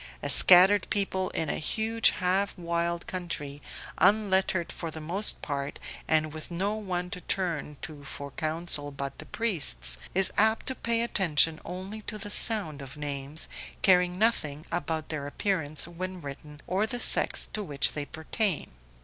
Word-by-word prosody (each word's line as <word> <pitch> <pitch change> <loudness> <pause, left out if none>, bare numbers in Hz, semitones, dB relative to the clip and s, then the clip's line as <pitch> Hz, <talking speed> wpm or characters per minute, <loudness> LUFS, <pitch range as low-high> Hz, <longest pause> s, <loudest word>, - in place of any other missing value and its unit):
A - - +2
scattered 190 +2 +8
people 190 -2 0
in 160 - -2
a - - -2
huge 220 +7 +2
half 190 +3 0
wild 170 0 -2
country, 150 -6 -5 0.4
unlettered 190 -2 +2
for 165 - -6
the 160 0 -8
most 180 +7 +1
part 140 -1 -4 0.3
and 155 -1 +1
with 155 -1 -7
no 190 +4 -1
one 180 -4 -4
to 180 -3 -5
turn 165 -7 -2
to 150 -2 -8
for 140 0 -6
counsel 155 0 -1
but 140 -1 -6
the - - -8
priests, 95 - +2 0.2
is 190 0 +3
apt 220 +1 +4
to 260 - 0
pay 235 -2 +1
attention 165 -7 +2
only 190 +4 -7
to 215 0 -6
the 205 0 -6
sound 200 -12 +1
of 135 +2 -10
names, 145 +1 -3 0.4
caring 180 -1 +4
nothing 160 -9 +1
about 160 -2 -3
their 145 -3 -4
appearance 155 -2 -1
when 185 +2 -6
written 145 0 -9
or 195 +4 0
the 245 +2 -4
sex - - +4
to 215 - -2
which 145 -8 -1
they 145 -1 -4
pertain. 165 +4 -2
170 Hz, 160 wpm, -28 LUFS, 150-195 Hz, 0.4 s, scattered